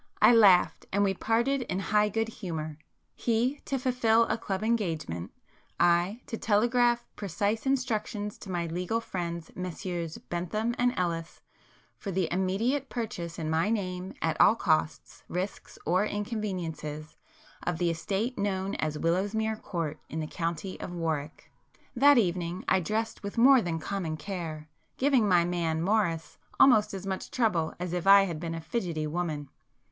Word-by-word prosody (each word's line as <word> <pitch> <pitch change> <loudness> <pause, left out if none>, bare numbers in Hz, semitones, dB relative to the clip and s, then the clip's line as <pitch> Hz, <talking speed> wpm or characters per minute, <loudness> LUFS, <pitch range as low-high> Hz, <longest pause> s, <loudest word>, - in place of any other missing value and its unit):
I - - +7
laughed, 200 -6 +5
and 200 +1 +2
we 195 -1 +2
parted 235 +8 +1
in 190 -6 -3
high 210 +2 +2
good 225 +2 0
humour,—he 210 - -3
to 275 - -1
fulfil 245 -3 +3
a - - 0
club 200 -3 -3
engagement, 165 - -1 0.5
I 175 +7 +3
to 225 - -5
telegraph 240 +2 +2
precise 205 - -1
instructions 215 -5 -1
to 195 - -10
my 175 -2 -1
legal 180 +7 -1
friends 170 -6 -5
Messrs 175 -2 -4
Bentham 210 +7 -2
and 245 0 +3
Ellis, 170 -2 -2 0.6
for 200 - -5
the 185 -2 0
immediate 225 +10 0
purchase 205 -8 -4
in 160 -2 -3
my 165 +6 +2
name 185 -4 -2
at 160 -1 +1
all 215 - +7
costs, 155 -7 0
risks 185 +3 -5
or 185 +4 +3
inconveniences, 180 -9 -4 0.5
of 175 -2 -2
the 170 0 +1
estate 195 +9 -2
known 195 -1 -1
as 155 -1 -2
Willowsmere 205 +7 0
Court 160 -4 -3
in 160 - -4
the 155 - -2
county 170 +3 -4
of - - -6
Warwick. 160 -3 -4 0.4
That 285 +2 +6
evening 180 -4 0
I - - +4
dressed 215 +6 -2
with 200 +1 -6
more 260 +2 +7
than 170 -5 -2
common 165 -2 -3
care, 160 -3 -5 0.3
giving 260 -6 +3
my 175 -2 +5
man 170 -2 -1
Morris 170 -3 0 0.2
almost 215 -6 +6
as 190 0 -6
much 190 -1 -4
trouble 195 -10 0
as 180 -1 -3
if 180 +1 -2
I 200 0 +9
had 170 -5 -3
been 165 0 -4
a 165 - -5
fidgetty 165 -4 -2
woman. 155 -3 -3
190 Hz, 155 wpm, -29 LUFS, 170-220 Hz, 0.6 s, I